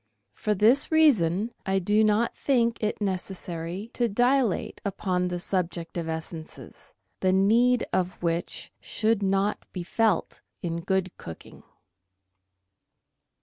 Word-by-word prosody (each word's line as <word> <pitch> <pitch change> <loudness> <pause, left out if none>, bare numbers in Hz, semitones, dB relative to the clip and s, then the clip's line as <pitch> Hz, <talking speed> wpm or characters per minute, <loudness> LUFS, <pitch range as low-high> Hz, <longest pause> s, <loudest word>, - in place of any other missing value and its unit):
For 210 -1 -1
this 235 - +4
reason 225 - +4
I 195 0 0
do 205 +4 +3
not 215 +2 +2
think 235 -4 +1
it 215 -1 -1
necessary 185 0 -4
to 240 -1 +1
dilate 245 -1 +1
upon 185 -2 -1
the 180 0 -2
subject 175 -2 -2
of 165 -2 -3
essences, 160 0 -7 0.2
the 185 - +2
need 230 +6 +4
of 185 0 +1
which 170 0 -2
should 220 -1 0
not 195 +1 +1
be 180 - -5
felt 215 0 0 0.2
in 170 -1 -2
good 190 0 -1
cooking. 80 - -10
195 Hz, 120 wpm, -26 LUFS, 175-225 Hz, 0.2 s, this